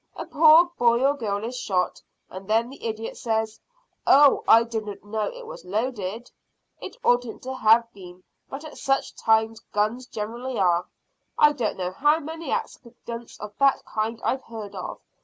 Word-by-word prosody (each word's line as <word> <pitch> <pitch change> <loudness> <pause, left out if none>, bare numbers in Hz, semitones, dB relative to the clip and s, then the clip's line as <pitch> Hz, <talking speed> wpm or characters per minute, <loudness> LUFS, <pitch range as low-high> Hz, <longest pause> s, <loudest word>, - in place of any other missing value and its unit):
A - - -6
poor 315 +2 +6
boy 240 +2 +4
or 280 - +4
girl 210 -6 -3
is 245 +2 -5
shot, 180 -5 -1 0.3
and 190 +1 -10
then 230 +3 +2
the 275 - -13
idiot 225 0 -5
says, 220 -1 -2 0.5
`Oh, 285 0 +6
I 230 +1 +7
didn't 215 -3 -5
know 215 0 -2
it - - -10
was - - -10
loaded!' 215 +2 -3 0.5
It - - -9
oughtn't 245 -1 +1
to 260 +1 -4
have 230 -1 +4
been, 180 -2 -13 0.3
but 280 +3 -7
at 310 - -10
such 270 0 0
times 220 0 +2
guns 215 +5 -1
generally 235 +4 -5
are. 180 -2 +2 0.5
I 300 - +6
don't 245 -8 -2
know 180 -1 -3
how 295 +10 +3
many 320 0 -7
accidents 235 -1 -6
of 210 0 -8
that 275 -1 +3
kind 220 +1 -3
I've 260 +1 -1
heard 215 -3 -8
of. 185 -2 -6
230 Hz, 170 wpm, -25 LUFS, 210-265 Hz, 0.5 s, I